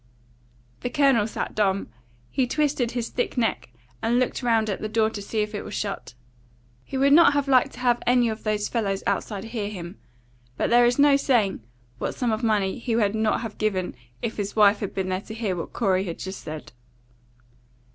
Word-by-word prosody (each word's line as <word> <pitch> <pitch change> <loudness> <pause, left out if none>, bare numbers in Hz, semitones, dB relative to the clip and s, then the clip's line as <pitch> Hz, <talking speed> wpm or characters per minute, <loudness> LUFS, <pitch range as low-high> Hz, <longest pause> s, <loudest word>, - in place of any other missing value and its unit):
The - - -3
Colonel 270 -7 +3
sat - - -4
dumb. 200 -2 0 0.4
He 255 - +1
twisted 280 -3 0
his 240 -2 -2
thick 250 - -2
neck, 230 - 0 0.3
and 235 +2 +2
looked 255 +1 0
round 225 -3 +2
at 200 - -3
the 215 - -3
door 220 0 +2
to 205 - -6
see 215 +2 -2
if 210 +1 -3
it 205 - -3
was - - -7
shut. 195 -11 -4 0.7
He 265 - -5
would 280 +1 +4
not 330 -2 +7
have 285 -1 0
liked 260 -2 +4
to 245 - -10
have 240 -1 +2
any 245 -1 +4
of 220 -1 -3
those 210 -1 0
fellows 200 -5 -1
outside 205 -3 -2
hear 225 -3 -4
him, 180 -2 -8 0.6
but - - 0
there 240 0 +6
is 245 - +1
no 285 -1 +6
saying 225 - +1 0.4
what - - -3
sum 245 -3 0
of 220 +1 -1
money 210 -3 +1
he 235 -1 -1
would 210 -3 +2
not 220 0 +1
have 225 -2 -7
given 190 -4 -1 0.3
if 225 - -3
his 205 -1 -3
wife 210 -1 +5
had 200 - -5
been 190 -1 -1
there 185 0 -1
to 220 - -9
hear 215 -5 -2
what 170 - -5
Corey 190 -4 +1
had 170 -3 -5
just 190 +1 -6
said. 155 0 -8
220 Hz, 205 wpm, -25 LUFS, 200-245 Hz, 0.7 s, not